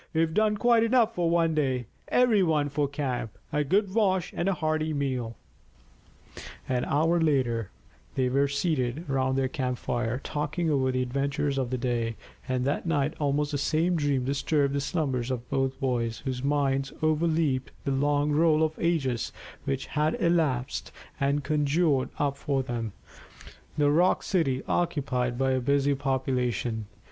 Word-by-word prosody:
We've 160 Hz, 0 st, +2 dB
done 215 Hz, +1 st, +2 dB
quite 235 Hz, +1 st, +4 dB
enough 230 Hz, -1 st, +3 dB
for 175 Hz, -5 st, 0 dB
one 165 Hz, -1 st, +2 dB
day. 130 Hz, -5 st, 0 dB, 0.2 s
Every 245 Hz, -5 st, +4 dB
one 155 Hz, -5 st, +2 dB
for 145 Hz, 0 st, 0 dB
camp, 130 Hz, -6 st, -3 dB, 0.2 s
a 150 Hz, -, +2 dB
good 190 Hz, +6 st, +1 dB
wash, 190 Hz, -5 st, +1 dB
and 185 Hz, -, 0 dB
a 195 Hz, -, +1 dB
hearty 155 Hz, -1 st, -1 dB
meal." 130 Hz, -5 st, -2 dB, 1.3 s
An 125 Hz, -1 st, 0 dB
hour 165 Hz, +4 st, +2 dB
later 125 Hz, -9 st, +1 dB, 0.5 s
they 130 Hz, -1 st, +2 dB
were 140 Hz, +3 st, +2 dB
seated 140 Hz, 0 st, -1 dB
round 130 Hz, -1 st, 0 dB
their 135 Hz, -1 st, +2 dB
camp 130 Hz, -2 st, -2 dB
fire, 120 Hz, 0 st, -2 dB
talking 155 Hz, +2 st, -2 dB
over 130 Hz, -2 st, +2 dB
the 130 Hz, 0 st, 0 dB
adventures 140 Hz, +2 st, -1 dB
of 130 Hz, -2 st, -1 dB
the 130 Hz, -, -1 dB
day, 120 Hz, -2 st, -1 dB, 0.3 s
and 130 Hz, 0 st, 0 dB
that 145 Hz, +5 st, -1 dB
night 150 Hz, -2 st, +1 dB
almost 145 Hz, 0 st, 0 dB
the 145 Hz, -, -1 dB
same 160 Hz, +5 st, +1 dB
dream 145 Hz, -5 st, 0 dB
disturbed 140 Hz, +1 st, +1 dB
the 140 Hz, -, 0 dB
slumbers 135 Hz, -6 st, -1 dB
of 125 Hz, -2 st, -3 dB
both 135 Hz, -1 st, 0 dB
boys, 120 Hz, -3 st, -1 dB
whose 130 Hz, -2 st, -2 dB
minds 135 Hz, -1 st, +1 dB
overleaped 155 Hz, -4 st, +1 dB, 0.2 s
the 140 Hz, -, 0 dB
long 145 Hz, +2 st, +1 dB
roll 155 Hz, +1 st, +4 dB
of 160 Hz, 0 st, +1 dB
ages 135 Hz, -9 st, 0 dB, 0.3 s
which 135 Hz, -1 st, -2 dB
had 155 Hz, +1 st, 0 dB
elapsed, 155 Hz, -7 st, 0 dB, 0.3 s
and 140 Hz, +1 st, +1 dB
conjured 150 Hz, 0 st, +1 dB
up 140 Hz, -1 st, 0 dB
for 140 Hz, -1 st, -1 dB
them 115 Hz, -3 st, -3 dB, 0.9 s
the 145 Hz, -1 st, +3 dB
rock 175 Hz, +5 st, +3 dB
city 135 Hz, -9 st, 0 dB
occupied 125 Hz, -7 st, 0 dB
by 135 Hz, 0 st, +1 dB
a 130 Hz, -, +2 dB
busy 140 Hz, +2 st, +2 dB
population. 125 Hz, -5 st, -1 dB
140 Hz, 160 wpm, -27 LUFS, 130-160 Hz, 1.3 s, quite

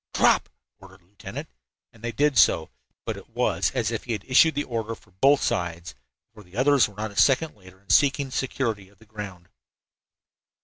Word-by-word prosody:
"Drop!" -, -, +3 dB, 0.3 s
ordered 95 Hz, 0 st, -16 dB
the -, -, -31 dB
lieutenant, 100 Hz, +3 st, -9 dB, 0.5 s
and 115 Hz, -1 st, -20 dB
they 120 Hz, -, -2 dB
did 145 Hz, +4 st, +1 dB
so, 85 Hz, -7 st, +4 dB, 0.3 s
but -, -, -3 dB
it -, -, -13 dB
was -, -, 0 dB
as -, -, 0 dB
if -, -, -4 dB
he 120 Hz, -, -2 dB
had 110 Hz, -, -4 dB
issued 140 Hz, +4 st, +5 dB
the 145 Hz, -, 0 dB
order 115 Hz, -2 st, -4 dB
for 105 Hz, -, -24 dB
both 135 Hz, +10 st, +3 dB
sides, 85 Hz, -4 st, -2 dB, 0.4 s
for 110 Hz, -, -14 dB
the 95 Hz, +1 st, -14 dB
others 135 Hz, -2 st, +4 dB
were 100 Hz, -, -17 dB
not 105 Hz, +1 st, -4 dB
a -, -, -15 dB
second 145 Hz, +7 st, +3 dB
later 95 Hz, -2 st, -17 dB
in 100 Hz, 0 st, -7 dB
seeking 140 Hz, +3 st, +3 dB
the -, -, -16 dB
security 115 Hz, -7 st, -2 dB
of 100 Hz, -, -26 dB
the 110 Hz, -, -20 dB
ground. 100 Hz, -5 st, -9 dB
110 Hz, 205 wpm, -25 LUFS, 95-130 Hz, 0.5 s, issued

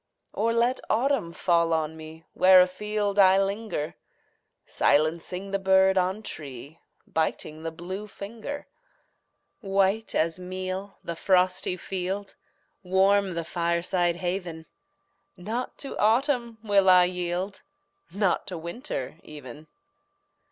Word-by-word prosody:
Or 225 Hz, +2 st, +1 dB
let 235 Hz, +2 st, +2 dB
autumn 240 Hz, -6 st, +1 dB
fall 170 Hz, -1 st, +2 dB
on 160 Hz, 0 st, -1 dB
me 160 Hz, +1 st, -11 dB
Where 185 Hz, 0 st, +7 dB
afield 205 Hz, +2 st, 0 dB
I 190 Hz, 0 st, +7 dB
linger, 195 Hz, -5 st, -2 dB, 0.7 s
Silencing 170 Hz, +5 st, +1 dB
the 195 Hz, -, 0 dB
bird 190 Hz, 0 st, +4 dB
on 190 Hz, +3 st, 0 dB
tree, 145 Hz, -, -8 dB, 0.3 s
Biting 155 Hz, -1 st, -2 dB
the 165 Hz, -, -3 dB
blue 185 Hz, +6 st, -7 dB
finger. 230 Hz, +8 st, -7 dB, 0.9 s
White 195 Hz, +1 st, 0 dB
as 165 Hz, +2 st, +1 dB
meal 185 Hz, +2 st, -5 dB
the 170 Hz, -, -4 dB
frosty 185 Hz, 0 st, +2 dB
field 195 Hz, +2 st, -4 dB, 0.5 s
Warm 190 Hz, 0 st, +2 dB
the 170 Hz, -, -2 dB
fireside 170 Hz, +1 st, 0 dB
haven 175 Hz, -2 st, -4 dB, 0.7 s
Not 220 Hz, +8 st, -4 dB
to 275 Hz, -, -7 dB
autumn 235 Hz, +1 st, +2 dB
will 200 Hz, -3 st, +4 dB
I 180 Hz, -1 st, +8 dB
yield, 180 Hz, +2 st, -2 dB, 0.5 s
Not 195 Hz, -1 st, 0 dB
to 180 Hz, -, -4 dB
winter 170 Hz, -, -6 dB
even! 150 Hz, 0 st, -11 dB
185 Hz, 115 wpm, -26 LUFS, 170-200 Hz, 0.9 s, I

